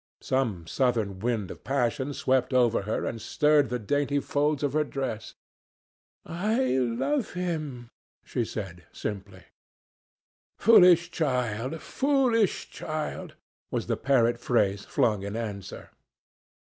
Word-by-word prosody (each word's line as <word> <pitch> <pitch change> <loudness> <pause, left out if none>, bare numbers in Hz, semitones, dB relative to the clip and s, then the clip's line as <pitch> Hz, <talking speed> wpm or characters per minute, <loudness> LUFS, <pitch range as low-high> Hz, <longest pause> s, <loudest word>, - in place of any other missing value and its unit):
Some 115 -11 -1
southern 110 -3 0
wind 110 -4 -1
of - - -11
passion 130 +1 0
swept 130 0 +1
over 120 -4 +3
her - - -1
and 115 - -4
stirred 150 +2 +3
the 125 - -1
dainty 145 +5 0
folds 145 +1 0
of 140 -2 0
her 155 0 +2
dress. 130 -7 -5 0.9
"I 215 +9 0
love 130 - 0
him," 155 -9 -4 0.3
she 120 - -1
said 95 -6 -6
simply. 100 -3 -6 1.1
"Foolish 180 -6 +6
child! 125 -1 -1
foolish 260 -7 +1
child!" 155 -1 -5 0.3
was - - -2
the - - 0
parrot 120 -4 +2
phrase 100 -5 +1
flung 105 -4 +1
in 100 +2 -5
answer. 100 -4 -6
130 Hz, 120 wpm, -27 LUFS, 110-150 Hz, 1.1 s, Foolish